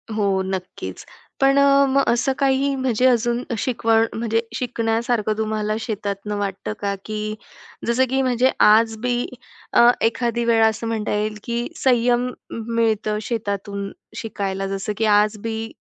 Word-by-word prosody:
हो 200 -3 +1
नक्कीच. 190 -1 -6 0.4
पण 275 +1 +4
अ, 280 0 +5
मग 275 +1 +3
असं 245 +3 +2
काही 275 0 +2
म्हणजे 255 -2 0
अजून 240 0 +1
शिकवण 225 -1 +2
म्हणजे 225 0 0
शिकण्यासारखं 230 -2 0
तुम्हाला 215 -1 -1
शेतातनं 210 -2 -4
वाटतं 200 0 -3
का 200 -1 0
की 215 0 -3 0.5
जसं 240 +3 +3
की 265 +1 +1
म्हणजे 255 0 +2
आज 225 +1 +5
बी 245 0 0 0.5
अ, 235 - +7
एखादी 235 +1 0
वेळ 230 -1 +4
असं 220 +1 0
म्हणता 220 -2 -2
येईल 210 0 -1
की 235 +1 -2 0.2
संयम 245 -1 +3 0.2
मिळतं 225 -2 0
शेतातून 200 -3 -3 0.3
शिकायला 195 -3 -3
जसं 195 +2 -3
की 220 - +1
आज 210 0 +3
बी, 225 0 -4
225 Hz, 140 wpm, -22 LUFS, 210-240 Hz, 0.5 s, अ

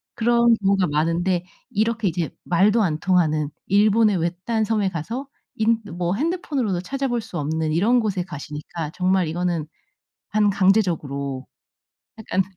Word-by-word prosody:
그런 235 0 +4
경우가 195 -2 +2
많은데 170 +4 0 0.2
이렇게 220 0 0
이제 170 -2 -2
말도 205 +6 +3
안 155 -5 0
통하는 155 -5 +2 0.2
일본의 210 0 +4
외딴 180 +7 -1
섬에 210 -3 +1
가서 225 - -5 0.3
인 225 +1 +2
뭐 175 +1 -1
핸드폰으로도 280 - -1
찾아볼 260 +2 -2
수 215 -5 -7
없는 155 +1 -1
이런 225 +9 +3
곳에 195 -5 -1
가시니까 150 0 -6
정말 185 -1 +1
이거는 170 -1 -2 0.6
반강제적으로 185 -10 +1 0.7
약간 190 -3 0
185 Hz, 300 characters per minute, -23 LUFS, 165-220 Hz, 0.7 s, 그런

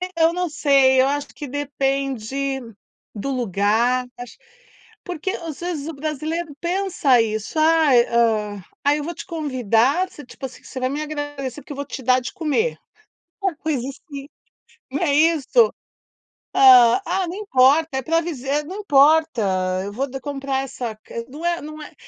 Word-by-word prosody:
Eu 330 0 +4
não 360 0 -1
sei, 275 -3 +4
eu 265 - +3
acho 285 +1 -1
que 290 - -7
depende 275 -1 -2 0.6
do 245 +7 -3
lugar, 235 +2 +1
acho, 245 -1 -9 0.7
porque 360 +1 -3
às 330 -6 -6
vezes 345 -4 -4
o 325 - -5
brasileiro 310 +2 -4
pensa 350 -8 +2
isso, 220 +6 -3
"Ai, 310 -6 +5
hã, 215 -4 +1 0.2
ai 290 +1 +3
eu 295 - -4
vou 340 +1 -5
te - - -8
convidar" 275 - +1
você, 295 - -12
tipo 260 - -9
assim, 260 - -10
você 260 - -7
vai 255 0 0
me 290 +3 -3
agradecer 290 -3 -5
porque 340 - -13
eu 280 - -11
vou 280 - -4
te 270 - -7
dar 255 +1 +4
de 250 - -6
comer, 395 - 0 0.6
uma 385 -2 0
coisa 295 -6 -2
assim, 280 0 -9 0.6
não 285 +5 -1
é 290 -5 +2
isso? 325 - +4 0.8
Hã, 250 +3 +7
ah 370 +1 -1
não 345 - -5
importa, 310 -5 +3
é - - -1
pra 330 +5 +1
dizer: 295 -3 -2
"Não 370 +6 -7
importa, 270 - +3
eu 200 - -5
vou 270 +6 -2
de 270 +1 -6
comprar 275 -1 -3
essa 240 -4 -5 0.3
não 295 +5 -9
é 345 0 +1
não 305 +1 -9
é - - -12
280 Hz, 170 wpm, -22 LUFS, 255-320 Hz, 0.8 s, Hã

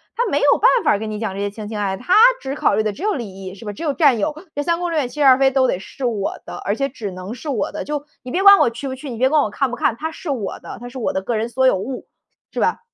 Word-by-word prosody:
他 485 - +1
没 285 - +2
有 285 - +4
办 485 - +5 0.2
法 - - +5
儿 200 - +1
跟 215 -1 -4
你 210 - -4
讲 220 -4 -3
这 195 - -6
些 205 - -1
情 210 0 -8
情 215 0 -5
爱 205 -1 -1
爱。 190 - -3
他 300 +9 -1 0.3
只 270 +1 -5
考 250 - +2
虑 215 - +1
的 215 - -1
只 305 - -9
有 425 0 +1
利 195 -7 -7
益， 185 -1 -7
是 215 - -12
吧？ 205 - -4
只 270 - -8
有 295 - 0
占 280 -6 +4
有。 220 +8 -1 0.2
这 290 - -1
三 335 +2 0
宫 355 0 -2
六 330 - -1
院 260 -5 0
七 - - -13
十 285 - +3
二 260 -1 +8
妃 270 0 +4
都 260 -1 +3
得 - - 0
是 260 +6 -7
我 215 -5 -2
的， - - -7
而 200 - 0
且 275 +3 0
只 225 -7 -6
能 185 +4 -7
是 290 +4 -7
我 250 - -1
的。 - - -4
就 295 -1 -4 0.2
你 250 - -7
别 370 - 0
管 400 0 +9
我 - - +4
去 235 +4 -7
不 260 - -4
去， 270 +1 -8
你 235 - -6
别 260 +3 +3
管 305 +1 +4
我 215 - -1
看 260 +5 -1
不 245 - -4
看， 230 - +1
她 320 +1 -4
是 325 - -8
我 240 -8 -3
的， - - -8
她 245 - -8
是 255 +2 -9
我 235 - -1
的 190 - -2
个 230 +4 -2
人 225 +2 -1
所 260 +2 +2
有 255 - +4
物， 230 +8 -5 0.5
是 - - -3
吧？ - - +1
250 Hz, 375 characters per minute, -20 LUFS, 210-285 Hz, 0.5 s, 管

